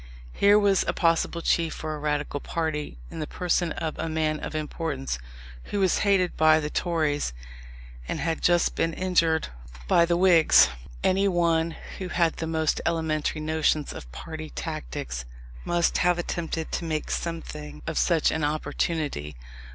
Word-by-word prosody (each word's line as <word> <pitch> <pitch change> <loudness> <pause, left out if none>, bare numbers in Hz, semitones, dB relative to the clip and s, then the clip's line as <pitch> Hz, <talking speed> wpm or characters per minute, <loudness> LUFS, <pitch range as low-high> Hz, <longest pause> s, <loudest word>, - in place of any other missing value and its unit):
Here 205 +1 +5
was 200 -2 +3
a - - +1
possible 165 0 +1
chief 165 -2 +1
for 155 -1 -4
a 150 - -5
Radical 150 -1 -1
party 155 - -3
in - - -7
the 155 - -3
person 175 -1 0
of 160 -2 -4
a 165 - -2
man 155 -1 0
of - - -6
importance, 150 - -3 0.5
who 205 - -3
was 190 -3 +3
hated 195 -3 +2
by 155 0 +5
the 150 -1 -4
Tories 155 - 0 0.7
and - - -3
had 165 -1 -1
just 175 -1 +3
been 165 0 0
injured 165 -3 +1 0.4
by 170 - +5
the 170 0 +1
Whigs. 175 -3 +6 0.3
Any 195 +2 +3
one 170 -3 +1 0.2
who 185 - -4
had 170 -2 +1
the 160 - -3
most 160 -1 0
elementary 160 -2 -1
notions 155 -1 0
of - - -10
party 80 - -7
tactics, - - -5 0.4
must 175 -1 +1
have 175 0 +3
attempted 165 -2 -3
to - - -2
make 155 -2 -2
something 75 - -5
of - - -1
such 165 -3 +3
an 160 - -1
opportunity. 150 - -2
160 Hz, 160 wpm, -26 LUFS, 155-170 Hz, 0.7 s, Whigs